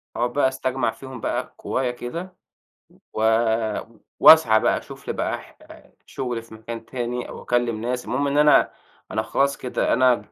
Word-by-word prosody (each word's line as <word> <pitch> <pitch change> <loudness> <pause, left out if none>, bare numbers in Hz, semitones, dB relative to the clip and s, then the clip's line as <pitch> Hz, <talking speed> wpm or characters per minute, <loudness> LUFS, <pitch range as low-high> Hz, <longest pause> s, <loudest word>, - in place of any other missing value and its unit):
أقعُد 120 0 -1
بقى 145 -2 +3
أستجمِع 130 -2 -1
فيهم 130 -1 -10
بقى - - -3
قوايا 130 -2 -1
كده 165 +10 -7 0.8
و 110 - -3 1.0
وأسعى 115 -9 +8
بقى - - +2
أشوف - - -11
لي - - -1
بقى - - -2
ح - - -18 0.5
شُغل 125 -3 -4
في 115 0 -16
مكان 115 +1 -8
تاني 125 -1 -4
أو - - -9
أكلّم 120 -3 0
ناس، 125 +1 -3
المهم 140 +3 -1
إن 140 +1 0
أنا 150 -1 +5 0.4
أنا 110 - 0
خلاص 140 +4 0
كده، 125 - -1
أنا 125 -4 +2
125 Hz, 165 wpm, -23 LUFS, 115-135 Hz, 1.0 s, وأسعى